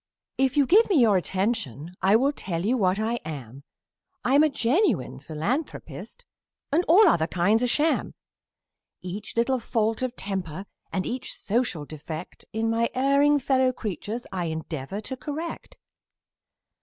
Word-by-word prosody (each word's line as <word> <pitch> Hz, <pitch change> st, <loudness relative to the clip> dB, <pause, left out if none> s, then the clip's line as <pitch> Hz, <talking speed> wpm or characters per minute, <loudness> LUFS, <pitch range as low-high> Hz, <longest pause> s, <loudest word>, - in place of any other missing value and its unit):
If 270 Hz, +2 st, +2 dB
you 285 Hz, -, +5 dB
give 425 Hz, -, +5 dB
me 390 Hz, -, +3 dB
your 225 Hz, -5 st, +5 dB
attention, 185 Hz, -, -1 dB
I 195 Hz, +3 st, +4 dB
will 270 Hz, +5 st, +3 dB
tell 180 Hz, -, -4 dB
you 240 Hz, +5 st, +2 dB
what 190 Hz, -5 st, +2 dB
I 225 Hz, +2 st, 0 dB
am: 140 Hz, -4 st, -8 dB, 0.6 s
I'm 275 Hz, +4 st, +5 dB
a 310 Hz, -, +5 dB
genuine 250 Hz, -, +1 dB
philanthropist 225 Hz, -, -4 dB, 0.6 s
all 385 Hz, +6 st, +7 dB
other 160 Hz, -, +3 dB
kinds 200 Hz, +7 st, +2 dB
are 250 Hz, -, +2 dB
sham. 305 Hz, +6 st, +1 dB, 0.9 s
Each 200 Hz, +5 st, -6 dB
little 255 Hz, +2 st, +2 dB
fault 225 Hz, 0 st, 0 dB
of 255 Hz, -1 st, -2 dB
temper 190 Hz, -2 st, -4 dB, 0.3 s
and 185 Hz, -, -1 dB
each 250 Hz, +1 st, -4 dB
social 210 Hz, -8 st, -1 dB
defect 155 Hz, +1 st, -8 dB
In 220 Hz, +1 st, -1 dB
my 230 Hz, +1 st, +1 dB
erring 280 Hz, +3 st, +4 dB
fellow 260 Hz, -1 st, +2 dB
creatures, 220 Hz, 0 st, -5 dB
I 180 Hz, -2 st, -2 dB
endeavor 160 Hz, +2 st, -4 dB
to 260 Hz, +5 st, -5 dB
correct. 310 Hz, +5 st, -6 dB
225 Hz, 145 wpm, -26 LUFS, 180-260 Hz, 0.9 s, all